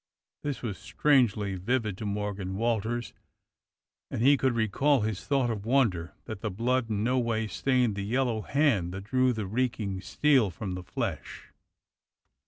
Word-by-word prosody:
This 145 -4 -4
was 105 -5 -4
strangely 115 -9 +2
vivid 110 +1 -1
to 110 - -3
Morgan 100 -2 -3
Walters, 115 +1 -1 1.0
and - - -4
he 140 +3 +7
could 130 -2 +1
recall 125 +5 +2
his 100 -4 -3
thought 135 -4 +2
of 105 -3 -4
wonder 110 -9 +1
that 110 -3 -7
the 110 - -2
blood 115 +4 0
in 105 -1 -1
no 125 +2 +2
way 115 -2 0
stained 125 0 +1
the 100 - -3
yellow 115 +1 0
hand 110 - +1
that 95 - -6
drew 130 +4 +2
the 110 -4 -3
reeking 110 -3 -2
steel 120 +3 +3
from 95 +2 -5
the 90 - -5
flesh. 90 - -5
110 Hz, 160 wpm, -28 LUFS, 100-130 Hz, 1.0 s, he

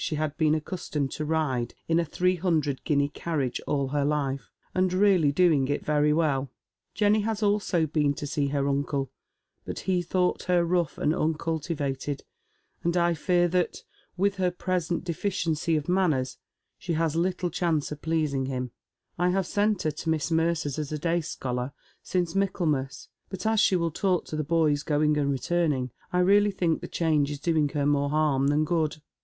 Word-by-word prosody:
ehe 155 - -1
had 155 -1 -2
been 155 -1 +3
accustomed 150 -4 -3
to 155 - -4
ride 150 -6 -1
in 165 0 +3
a - - +2
three 180 +3 +1
hundred 155 -6 0
guinea 140 -2 +2
carriage 145 -5 -2
all 140 -2 0
her 145 +1 0
life, 140 -2 -1 0.2
and 185 0 +2
really 185 -6 +4
doing 150 -4 +3
it 145 - -2
very 150 0 +3
welL 145 -4 +1 0.5
Jenny 210 0 +3
has 220 0 -2
also 200 -5 +2
been 150 -2 +1
to 145 - -5 0.2
eee 140 - +2
her 140 0 0
uncle, 140 -1 -1 0.5
but - - -5
he 185 -2 +1
thought 180 +1 0
her 180 -1 +3
rough 170 -3 0
and 150 - +1
uncultivated, 155 -3 -2 0.6
and 170 +1 +1
I 170 0 +3
fear 175 +2 +2
that, 180 0 -1 0.3
with 200 +2 +1
her 185 -1 +2
present 180 -2 -2
deficiency 170 -3 -1
of 150 -1 -2
manners, 155 -9 +1 0.4
she 180 -3 -3
has 160 -1 0
little 175 +1 0
chance 160 -4 0
of 150 - -6
pleasing 155 -5 0
hira. 130 -1 -3 0.5
I 180 0 +3
have 190 +1 +1
sent 205 +1 +1
her 155 - +1
to 155 +2 -5
Miss 160 +1 0
Mercer's 160 -3 0
as 150 -1 -4
a 155 - -1
day 170 +3 0
scholar, 125 -3 -4 0.3
since 175 -3 -1
Michaelmas, 160 -9 -1 0.2
but 190 0 -6
as 220 0 +3
she 195 - +4
will 170 -2 0
talk 180 +1 0
to - - -6
the 155 - -1
boys 150 -2 +2
going 150 0 +2
and 140 -1 +1
returning, 140 -2 0 0.2
I 180 - +2
really 205 +3 +5
think 175 -5 0
the - - -5
change 155 -4 +1
is 145 -1 -5
doing 155 -2 +1
her 145 -1 -1
more 145 0 +2
harm 145 -3 +2
than 150 +2 +2
good. 160 -3 0
160 Hz, 185 wpm, -27 LUFS, 145-180 Hz, 0.6 s, really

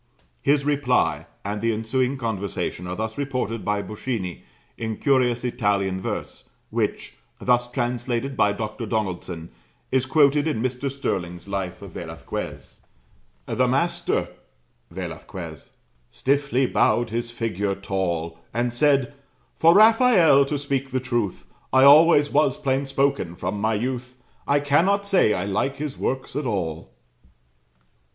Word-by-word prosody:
His 140 0 +2
reply, 125 - +1 0.2
and 105 +1 -3
the 115 - +2
ensuing 125 +5 0
conversation, 100 -6 -3
are 90 - -4
thus 110 +4 -4
reported 125 -5 -2
by 105 0 -1
Boschini, 105 -5 -4 0.3
in 110 -2 -4
curious 125 -4 +2
Italian 100 -6 0
verse, - - -5 0.2
which, - - -2 0.3
thus 125 0 +2
translated 125 +1 -2
by 105 - +3
Dr. 110 +3 -4
Donaldson, 90 -6 -3 0.4
is 130 0 +1
quoted 145 +1 +4
in 150 -8 -1
Mr. 130 +3 -2
Stirling's 90 -10 -4
Life 95 -2 -4
of 100 - -9
Velasquez: 80 -1 -7 0.7
"The - - +1
master" - - 0 0.6
[Velasquez] 85 -2 -7 0.4
"stiffly 140 -1 +1
bowed 120 -2 +2
his 120 +1 -2
figure 105 -4 -2
tall 85 -4 -3
And 120 +1 -1
said, 140 0 +2 0.4
'For 165 +2 +5
Rafael, 215 - +6
to 145 +1 -2
speak 140 -1 -2
the 130 0 -1
truth 120 -7 -2 0.3
I 130 0 +5
always 145 +1 +7
was 145 -3 +3
plain 135 +1 0
spoken 135 -10 0
from 100 +3 -3
my 110 +1 +1
youth 125 +2 -4 0.3
I 145 0 +3
cannot 180 +8 +2
say 190 - +3
I 90 - -2
like 105 +7 -1
his 145 -1 -4
works 130 -1 -3
at 145 -2 -1
all.' 85 - -3
120 Hz, 130 wpm, -24 LUFS, 100-140 Hz, 0.7 s, always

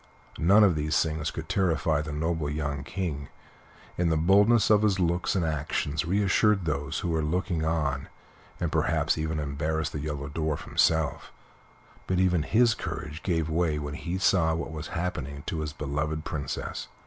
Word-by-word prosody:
None 100 +6 +6
of 100 -4 +5
these 75 0 +1
things 80 -1 -2
could 80 -1 -6
terrify 80 -5 +1
the 75 +1 -5
noble 80 0 -1
young 70 -2 -3
King, 75 -5 -4 0.7
and 85 -2 +2
the 80 - +2
boldness 105 +8 +4
of 105 -1 +6
his 100 -3 +2
looks 90 +1 +1
and 90 -3 +1
actions 75 0 -1
reassured 100 +1 +2
those 75 -2 -2
who 90 - -2
were 80 -1 +1
looking 85 +1 -1
on, 75 -4 -1 0.5
and - - -1
perhaps - - +1
even 80 0 -2
embarrassed 75 +2 -2
the 75 - -3
Yellow 75 -1 -4
Dwarf 75 0 -2
himself; 80 -4 +1 0.8
but 95 - 0
even 90 -3 +3
his 115 +8 +3
courage 75 -6 -6
gave 80 -4 0
way 80 -1 +1
when 75 -1 -4
he 85 +3 -3
saw 90 -3 +3
what 80 -1 -4
was 75 -1 -6
happening 75 -5 -4
to 80 - -3
his 75 -1 -3
beloved 75 +2 -3
Princess. 70 -3 -4
80 Hz, 170 wpm, -27 LUFS, 75-90 Hz, 0.8 s, None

